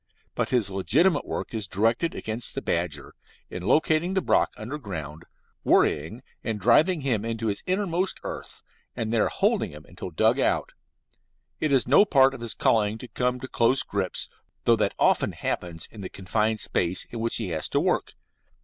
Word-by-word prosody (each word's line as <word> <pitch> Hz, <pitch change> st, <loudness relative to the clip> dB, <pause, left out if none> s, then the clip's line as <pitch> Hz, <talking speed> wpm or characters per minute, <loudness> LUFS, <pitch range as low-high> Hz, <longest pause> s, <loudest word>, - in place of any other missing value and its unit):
But -, -, -1 dB
his 115 Hz, -6 st, +1 dB
legitimate 145 Hz, -, +3 dB
work -, -, -4 dB
is 110 Hz, -4 st, -2 dB
directed 115 Hz, -, 0 dB
against 110 Hz, +2 st, -2 dB
the -, -, -2 dB
badger, -, -, -2 dB, 0.4 s
in 90 Hz, -, -5 dB
locating 155 Hz, -, +2 dB
the 190 Hz, -, +2 dB
brock -, -, +2 dB
under 125 Hz, +8 st, -6 dB
ground, 80 Hz, -, -7 dB, 0.4 s
worrying 80 Hz, -, +2 dB, 0.2 s
and 110 Hz, -2 st, -2 dB
driving 155 Hz, -, +4 dB
him 120 Hz, -6 st, 0 dB
into 115 Hz, 0 st, -3 dB
his 100 Hz, -2 st, -1 dB
innermost 185 Hz, -1 st, 0 dB
earth, -, -, -7 dB, 0.3 s
and 115 Hz, -2 st, -2 dB
there 115 Hz, -, +3 dB
holding -, -, +1 dB
him 75 Hz, +1 st, -12 dB
until 90 Hz, +1 st, -8 dB
dug 80 Hz, -, +2 dB
out. -, -, +1 dB, 0.9 s
It 155 Hz, -, 0 dB
is 135 Hz, -4 st, +3 dB
no 140 Hz, +10 st, +7 dB
part 135 Hz, -9 st, +4 dB
of 135 Hz, -, -9 dB
his 115 Hz, -2 st, -3 dB
calling 110 Hz, -1 st, +2 dB
to 125 Hz, -, -9 dB
come 125 Hz, 0 st, -1 dB
to 130 Hz, -, -5 dB
close 125 Hz, +2 st, +2 dB
grips, 95 Hz, -3 st, -3 dB, 0.4 s
though -, -, +5 dB
that -, -, 0 dB
often -, -, +2 dB
happens 85 Hz, -2 st, -2 dB
in 110 Hz, -, -10 dB
the 95 Hz, -, -6 dB
confined 110 Hz, +3 st, -1 dB
space 90 Hz, +1 st, 0 dB
in 115 Hz, -, -5 dB
which 115 Hz, +1 st, 0 dB
he 110 Hz, -5 st, +1 dB
has 80 Hz, -2 st, -2 dB
to -, -, +1 dB
work. -, -, 0 dB
115 Hz, 180 wpm, -26 LUFS, 95-135 Hz, 0.9 s, no